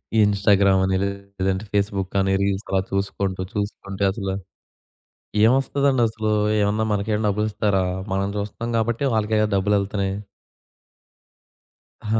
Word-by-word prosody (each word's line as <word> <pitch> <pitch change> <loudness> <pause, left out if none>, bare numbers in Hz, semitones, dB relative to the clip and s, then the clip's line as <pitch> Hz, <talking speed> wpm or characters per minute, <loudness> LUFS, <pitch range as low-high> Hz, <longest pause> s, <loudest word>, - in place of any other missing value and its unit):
ఈ - - +3
ఇన్‌స్టాగ్రామని 95 -2 +3
లేదంటే 100 0 -3
ఫేస్‌బుకని 100 -1 0
రీల్స్ 100 0 -1
అలా 95 -1 +2
చూసుకుంటూ, 95 -1 -2
చూసుకుంటే 100 -1 -4
అసలు 95 -2 -3 1.1
ఏమొస్తుందండసలు? 120 -3 +2 0.3
ఏమన్నా 105 +2 +1
మనకేమన్నా 105 +1 0
డబ్బులిస్తారా? 105 -2 0 0.3
మనం 100 0 0
జూస్తాం 105 +3 -4
కాబట్టే 115 +4 0
వాళ్ళకే 110 0 +1 0.2
డబ్బులెళ్తున్నాయి. 100 0 0 1.9
ఆ! - - -15
100 Hz, 95 wpm, -23 LUFS, 95-110 Hz, 1.9 s, ఈ